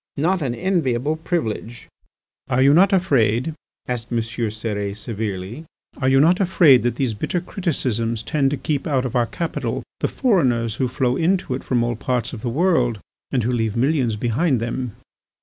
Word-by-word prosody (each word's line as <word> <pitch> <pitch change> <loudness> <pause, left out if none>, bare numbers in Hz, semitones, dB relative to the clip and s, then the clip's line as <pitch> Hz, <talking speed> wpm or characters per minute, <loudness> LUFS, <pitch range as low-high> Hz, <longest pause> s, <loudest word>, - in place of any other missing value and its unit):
Not 175 +5 +1
an 125 -4 -1
enviable 155 -6 0
privilege!" 120 -8 -3 0.6
"Are 130 +2 +3
you 140 +1 +6
not 190 +5 +5
afraid," 140 - +2 0.3
asked 120 -1 -4
M. 120 - 0
Cérès 110 -3 -3
severely, 110 - -5 0.3
"are 130 -2 +1
you 135 0 +5
not 170 +6 +4
afraid 170 -9 +5
that 120 -1 0
these 125 -3 -1
bitter 140 - -2
criticisms 125 - -2
tend 140 0 +1
to 145 - -2
keep 145 +2 -2
out 135 -4 +1
of 125 - -4
our 120 -1 +2
capital 165 +5 -3 0.2
the - - +1
foreigners 125 - +1
who 130 - +1
flow 125 0 0
into 175 -4 +1
it 130 - -4
from 120 -2 +1
all 120 0 -1
arts 125 -1 0
of 110 - -7
the 120 - -2
world 130 - +2 0.3
and 125 -3 0
who 120 - 0
leave 115 -3 -1
millions 130 -2 +1
behind 125 +5 +1
them?" 120 0 -3
125 Hz, 175 wpm, -21 LUFS, 115-155 Hz, 0.6 s, you